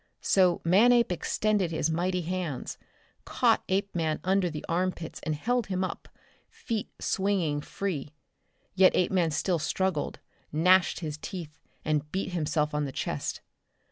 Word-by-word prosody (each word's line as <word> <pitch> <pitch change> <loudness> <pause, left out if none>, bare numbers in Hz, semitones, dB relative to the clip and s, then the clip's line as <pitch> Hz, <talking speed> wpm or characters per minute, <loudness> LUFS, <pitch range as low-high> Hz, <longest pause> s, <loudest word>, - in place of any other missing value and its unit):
So 185 -3 +3
Manape 235 +6 +5
extended 200 +1 0
his 160 -1 0
mighty 180 +2 0
hands, 170 -5 -4 0.4
caught - - +2
Apeman 180 -5 0
under 190 -1 +2
the 155 -2 -6
armpits 175 -1 -2
and 155 - -2
held 245 +8 0
him 185 -1 -1
up, 185 - -5 0.4
feet 225 -4 -4
swinging 185 -7 0
free. 155 -5 -4 0.6
Yet 190 -1 +5
Apeman 180 -2 +2
still 165 +3 0
struggled, 185 -1 -1 0.3
gnashed 180 +3 +4
his 155 -2 -4
teeth, 160 -4 -7 0.3
and 150 -1 0
beat 190 0 -2
himself 155 -2 0
on 150 0 0
the 135 - -4
chest. - - -3
180 Hz, 135 wpm, -28 LUFS, 155-190 Hz, 0.6 s, Manape